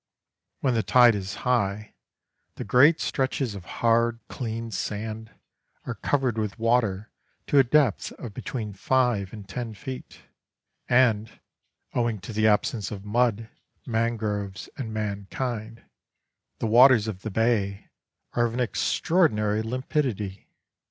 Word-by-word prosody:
When 130 -3 +2
the 115 - +2
tide 120 +3 +6
is 100 -2 -4
high, 105 -4 0 0.6
the - - -5
great 145 +6 +5
stretches 130 -3 -1
of 95 -3 -9
hard, 115 0 +1
clean 115 -2 -4
sand 110 +2 -4 0.6
are 125 - -3
covered 125 +1 0
with 105 -2 -3
water 115 -3 +1 0.3
to 145 - +4
a - - +7
depth 130 -3 +2
of 115 -5 -9
between 105 -1 -5
five 115 -2 +1
and 105 -3 -10
ten 115 +1 -5
feet, 130 +2 -8 0.7
and, 115 -4 +2 0.5
owing 115 -3 0
to 105 +4 -7
the 110 +1 +3
absence 105 -1 +1
of 100 -1 -7
mud, 115 0 +1 0.4
mangroves, 110 -4 -2
and 115 -5 -5
mankind, 110 +2 -4 0.7
the - - -3
waters 120 0 +6
of 95 -4 -5
the 110 - -4
bay 105 -2 0 0.4
are 120 - +2
of 115 - -6
an - - -2
extraordinary 110 - +1
limpidity. 115 - -3
115 Hz, 130 wpm, -26 LUFS, 105-125 Hz, 0.7 s, a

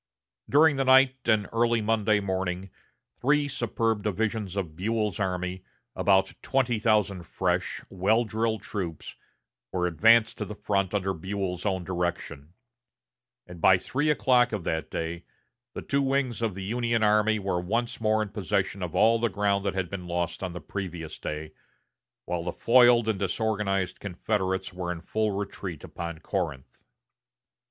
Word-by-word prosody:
During 145 0 +5
the 135 - +2
night 130 0 +5
and 105 -2 +2
early 115 0 +2
Monday 110 -1 +2
morning 95 -1 -3 0.5
three 145 +3 +2
superb 115 -4 -1
divisions 105 -1 -2
of 90 -6 -3
Buell's 105 +1 -1
army, 90 -1 -2 0.3
about 95 -1 +3
twenty 125 -4 +1
thousand 105 -4 +2
fresh, - - -1
well 100 +5 +2
drilled 110 0 -1
troops, 85 -7 -5 0.6
were 90 -1 0
advanced 110 +7 +4
to - - -2
the 105 - -7
front 100 -2 -1
under 95 -1 0
Buell's 95 +1 -3
own 95 -2 -1
direction; 85 -4 -4 0.9
and 90 -2 -11
by 95 - +6
three 140 +11 -1
o'clock 125 -2 +3
of 105 -5 -3
that 80 -1 -2
day 85 +1 -4 0.5
the - - -5
two 140 0 +1
wings 135 -3 0
of 110 -5 -1
the 95 - -6
Union 115 +2 0
army 105 +1 +3
were 95 -3 -1
once 115 +6 -2
more 110 0 +2
in 105 - -6
possession 100 -1 -1
of 90 -3 -4
all 115 +1 +4
the 115 0 +1
ground 100 0 0
that 100 - -1
had 95 -2 -1
been 90 -2 -5
lost 85 0 -2
on 95 -2 -4
the 90 - -6
previous 85 -5 -6
day, 75 +1 -5 0.7
while 90 -1 -2
the 90 - -2
foiled 120 -1 +5
and 110 -3 0
disorganized 100 -2 -1
Confederates 95 0 -2
were 90 -1 -3
in 85 -2 -5
full 110 +5 -1
retreat 95 -4 -5
upon 85 -1 -6
Corinth. 65 0 -4
100 Hz, 155 wpm, -27 LUFS, 90-115 Hz, 0.9 s, by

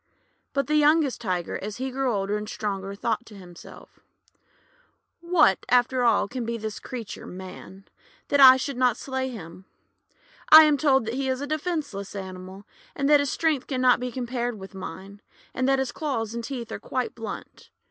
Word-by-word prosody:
But 275 -1 0
the 305 +2 +1
youngest 300 -3 +3
Tiger, 180 -6 -2
as 205 +1 -6
he 260 +1 -3
grew 265 0 0
older 200 -1 -1
and 210 0 -4
stronger, 195 -2 -4
thought 225 +3 -2
to 215 - -13
himself: 175 -3 -14 0.6
— - - -35 0.4
'What, 340 - +3
after 250 +1 +3
all, 230 -4 +3
can 250 +3 -5
be 230 0 -3
this 220 -1 -5
creature 235 -5 -7
Man, 190 +1 -10 0.4
that 285 - +2
I 260 -1 +10
should 265 0 -4
not 250 -2 +2
slay 265 -1 -3
him? 185 -5 -10 0.8
I 315 0 +11
am 305 -1 +4
told 270 -4 +2
that 225 - -3
he 265 +1 -2
is 260 0 -1
a 285 - -3
defenceless 295 - -4
animal, 190 0 -8 0.3
and 275 - 0
that 295 - +7
his 285 -1 0
strength 310 -5 0
can 260 -3 -2
not 250 -1 +5
be 250 0 -4
compared 245 -2 -3
with 195 0 -11
mine, 195 +1 -9 0.3
and 255 +1 0
that 270 - +3
his 265 -2 -1
claws 235 -8 -3
and 235 0 -4
teeth 240 -2 -6
are - - -5
quite 255 -1 -3
blunt. 225 -3 -8
245 Hz, 190 wpm, -25 LUFS, 205-270 Hz, 0.8 s, I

